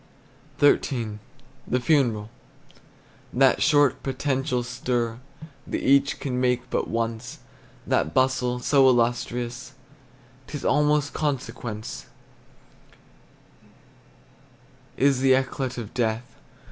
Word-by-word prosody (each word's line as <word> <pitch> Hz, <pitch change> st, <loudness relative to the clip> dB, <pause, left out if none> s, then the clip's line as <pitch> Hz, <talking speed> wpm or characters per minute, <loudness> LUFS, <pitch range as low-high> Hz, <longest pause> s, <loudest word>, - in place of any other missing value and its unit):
XIII. 120 Hz, -7 st, +2 dB, 0.5 s
THE 125 Hz, -, +1 dB
FUNERAL. 120 Hz, -6 st, +1 dB, 1.0 s
That 135 Hz, 0 st, +3 dB
short, 145 Hz, -4 st, +3 dB
potential 135 Hz, -1 st, -1 dB
stir 120 Hz, -1 st, -2 dB, 0.5 s
That -, -, -3 dB
each 140 Hz, +1 st, +3 dB
can 125 Hz, -2 st, -2 dB
make 125 Hz, 0 st, 0 dB
but -, -, -1 dB
once, 115 Hz, +1 st, -3 dB, 0.5 s
That 80 Hz, -, +1 dB
bustle 125 Hz, +2 st, +1 dB
so 135 Hz, +1 st, +4 dB
illustrious 120 Hz, +1 st, -1 dB, 0.7 s
'T 150 Hz, -, -5 dB
is -, -, -9 dB
almost 150 Hz, -1 st, +2 dB
consequence, 120 Hz, -6 st, -4 dB, 2.9 s
Is 135 Hz, -1 st, +3 dB
the 130 Hz, 0 st, +4 dB
eclat 130 Hz, -1 st, -2 dB
of 110 Hz, -3 st, -7 dB
death. 115 Hz, -1 st, -2 dB
125 Hz, 95 wpm, -25 LUFS, 120-135 Hz, 2.9 s, so